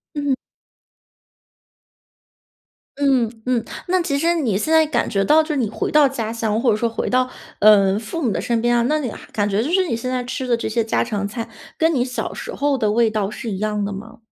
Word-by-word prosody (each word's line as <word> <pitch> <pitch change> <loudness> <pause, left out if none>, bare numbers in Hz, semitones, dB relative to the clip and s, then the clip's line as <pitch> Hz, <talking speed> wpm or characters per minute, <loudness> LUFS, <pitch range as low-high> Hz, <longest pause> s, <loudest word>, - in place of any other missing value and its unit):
嗯。 285 -2 0 2.7
嗯， 260 -5 +3 0.2
嗯， 245 -3 +1 0.2
那 370 0 +2
其 280 -4 -1
实 335 +3 +2
你 235 - 0
现 315 +8 -1
在 320 0 +6
感 - - 0
觉 195 -2 0
到 310 +1 +5
就 310 - -9
是 300 - 0
你 230 -6 0
回 - - -3
到 300 -2 +5
家 230 -4 -4
乡， 225 -1 -1
或 245 -2 +3
者 210 - +2
说 235 +2 0
回 225 - -3
到， 255 0 +1 0.3
呃， 200 -2 +6
父 225 +9 -5
母 245 -7 +1
的 - - -1
身 235 -1 0
边 240 +1 +2
啊， 235 - +3
那 305 +1 +2
你 265 -5 -3
还 - - -12
感 205 -1 0
觉 205 +2 +1
就 295 - -2
是 370 0 +2
你 230 - -1
现 255 +2 -4
在 250 -1 -2
吃 255 +1 -4
的 235 - +3
这 230 - -3
些 230 +1 0
家 225 - 0
常 205 -4 -2
菜， 230 +2 -5 0.3
跟 325 0 +2
你 245 -2 +2
小 250 -1 -4
时 - - -6
候 285 -1 0
的 220 -5 0
味 225 +1 +3
道 210 -2 -1
是 230 +1 -6
一 190 - -4
样 210 -1 -1
的 200 - -3
吗？ 210 +3 -9
235 Hz, 255 characters per minute, -21 LUFS, 215-280 Hz, 2.7 s, 在